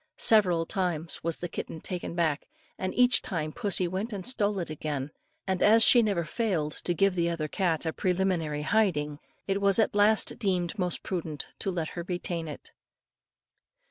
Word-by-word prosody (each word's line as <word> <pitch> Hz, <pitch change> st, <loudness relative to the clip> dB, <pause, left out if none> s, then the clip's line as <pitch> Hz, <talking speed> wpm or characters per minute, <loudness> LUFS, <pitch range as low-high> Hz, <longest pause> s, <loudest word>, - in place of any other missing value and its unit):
Several 180 Hz, -7 st, +4 dB
times 170 Hz, -3 st, -2 dB
was 165 Hz, 0 st, -1 dB
the 175 Hz, -, -4 dB
kitten 160 Hz, -1 st, -6 dB
taken 175 Hz, 0 st, -5 dB
back, 160 Hz, -3 st, 0 dB, 0.3 s
and 185 Hz, 0 st, -3 dB
each 250 Hz, 0 st, +5 dB
time 160 Hz, -6 st, -3 dB
pussy 195 Hz, -3 st, 0 dB
went 190 Hz, +6 st, -3 dB
and 195 Hz, -3 st, -4 dB
stole 210 Hz, -5 st, +1 dB
it 170 Hz, -4 st, -3 dB
again; 150 Hz, -2 st, -4 dB, 0.3 s
and 190 Hz, -1 st, -1 dB
as 225 Hz, +2 st, +6 dB
she 240 Hz, -, +7 dB
never 200 Hz, -6 st, 0 dB
failed 165 Hz, -4 st, -1 dB
to 175 Hz, +3 st, -2 dB
give 195 Hz, +2 st, +3 dB
the 170 Hz, -1 st, +1 dB
other 165 Hz, -2 st, -2 dB
cat 170 Hz, -1 st, -1 dB
a 160 Hz, -, -1 dB
preliminary 175 Hz, -5 st, 0 dB
hiding, 150 Hz, -8 st, +1 dB, 0.3 s
it 195 Hz, 0 st, -1 dB
was 200 Hz, -1 st, +4 dB
at 220 Hz, -, +2 dB
last 210 Hz, +1 st, +3 dB
deemed 185 Hz, 0 st, -1 dB
most 180 Hz, -1 st, -2 dB
prudent 165 Hz, -5 st, -4 dB
to -, -, -1 dB
let 170 Hz, -4 st, -2 dB
her 170 Hz, -, -6 dB
retain 175 Hz, -2 st, -3 dB
it. 150 Hz, -, -9 dB
180 Hz, 175 wpm, -28 LUFS, 160-200 Hz, 0.3 s, she